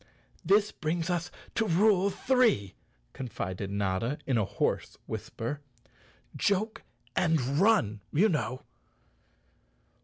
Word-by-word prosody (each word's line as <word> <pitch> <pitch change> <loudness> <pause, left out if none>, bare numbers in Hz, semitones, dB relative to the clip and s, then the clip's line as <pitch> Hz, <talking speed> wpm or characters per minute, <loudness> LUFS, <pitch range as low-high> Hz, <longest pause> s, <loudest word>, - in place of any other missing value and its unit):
"This 205 +1 +4
brings 165 +2 -2
us 175 0 -1 0.2
to 225 -1 +1
rule 195 +2 +4
three," 225 - +2 0.4
confided 100 -6 -4
Notta 100 +6 -1
in 135 - +1
a 110 -3 +2
hoarse - - -1
whisper. 140 +6 -5 0.7
"Joke 205 +2 0 0.3
and 165 -2 +3 0.2
run, 185 - +3
you 185 +9 +4
know!" 130 - -1
160 Hz, 100 wpm, -29 LUFS, -, 0.7 s, This